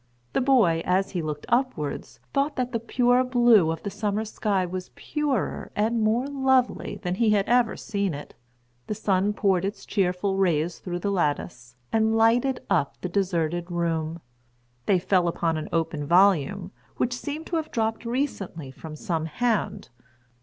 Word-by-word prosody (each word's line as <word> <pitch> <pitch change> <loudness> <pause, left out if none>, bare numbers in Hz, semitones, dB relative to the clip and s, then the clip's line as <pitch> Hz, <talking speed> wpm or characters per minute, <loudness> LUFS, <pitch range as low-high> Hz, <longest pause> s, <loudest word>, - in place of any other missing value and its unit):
The - - +2
boy, 230 -12 +4
as 190 +2 +1
he 180 - -2
looked 150 -2 -4
upwards, 240 - -1
thought 285 +1 +1
that 250 -1 -2
the 230 - -1
pure 245 +2 +2
blue 240 -8 +5
of 160 0 -3
the 200 - -3
summer 210 +1 -1
sky 205 -3 0
was 185 +1 -5
purer 290 -7 -2
and 225 +2 +1
more 220 +4 +2
lovely 265 -2 +1
than 180 -1 -1
he 220 +4 +2
had 205 -2 +2
ever 240 -2 +3
seen 200 -6 -2
it. 145 - -9 0.5
The 215 - -2
sun 200 -1 +1
poured 190 -3 +1
its 195 +2 -4
cheerful 190 0 0
rays 170 -3 +1
through 175 -1 -4
the 200 - 0
lattice, 145 -8 -2 0.2
and 220 0 +3
lighted 240 +4 +3
up 140 - 0
the 180 - -3
deserted 175 -2 -1
room; 165 -1 -2 0.7
they 195 - +4
fell 180 0 +2
upon 165 -1 0
an 155 - -4
open 160 -3 -1
volume, 185 +1 +3 0.3
which 250 - 0
seemed 290 +5 -5
to 340 - -1
have 315 -1 -3
dropped 225 -1 -1
recently 230 - -3
from 155 +3 -9
some 160 +1 -2
hand. 225 +6 -1
200 Hz, 165 wpm, -25 LUFS, 170-235 Hz, 0.7 s, blue